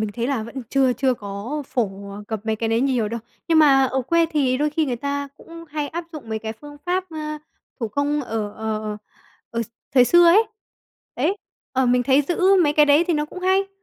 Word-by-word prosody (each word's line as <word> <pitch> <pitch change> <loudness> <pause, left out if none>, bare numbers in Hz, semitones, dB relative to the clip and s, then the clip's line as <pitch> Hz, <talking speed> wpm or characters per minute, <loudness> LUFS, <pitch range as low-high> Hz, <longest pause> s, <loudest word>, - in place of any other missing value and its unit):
mình 215 - -1
thấy 235 0 -1
là 260 -5 -1
vẫn 235 +4 -7
chưa 265 -2 +3
chưa 260 0 +1
có 205 +8 -5
phổ, 200 -4 -3
ờ, 205 +1 -8
cập 220 -2 -3
mấy 220 0 0
cái 225 +1 -2
đấy 225 +1 +2
nhiều 250 -5 +1
đâu. 230 +1 -4 0.3
Nhưng 325 -1 +5
mà 275 -3 +6
ở 260 0 0
quê 335 +5 +2
thì 280 -5 +1
đôi 300 +1 +1
khi 310 +1 0
người 245 -3 -2
ta 280 +2 -3
cũng 335 0 -12
hay 295 -1 -3
áp 340 +3 -5
dụng 300 -7 -9
mấy 220 0 -2
cái 220 0 -5
phương 290 +5 -12
pháp, 365 +1 0
ơ, 305 -1 -5 0.4
thủ 225 - -1
công 285 +5 0
ở 220 -3 -3
ờ, 220 -1 -3
ờ, 210 -1 -3 0.5
ở 230 0 -1
x 225 - -8 0.3
thời 250 - +7
xưa 345 +6 +6
ấy. 405 +7 +6 0.7
Đấy, 325 +11 +1 0.4
ờ, 260 -1 +2
mình 245 0 +3
thấy 275 +3 +4
giữ 345 +6 -2 0.2
mấy 295 - +2
cái 300 0 +5
đấy 290 +4 +5
thì 340 - +3
nó 300 0 0
cũng 365 +4 -9
hay. 380 +1 +2
270 Hz, 240 wpm, -22 LUFS, 230-305 Hz, 0.7 s, thời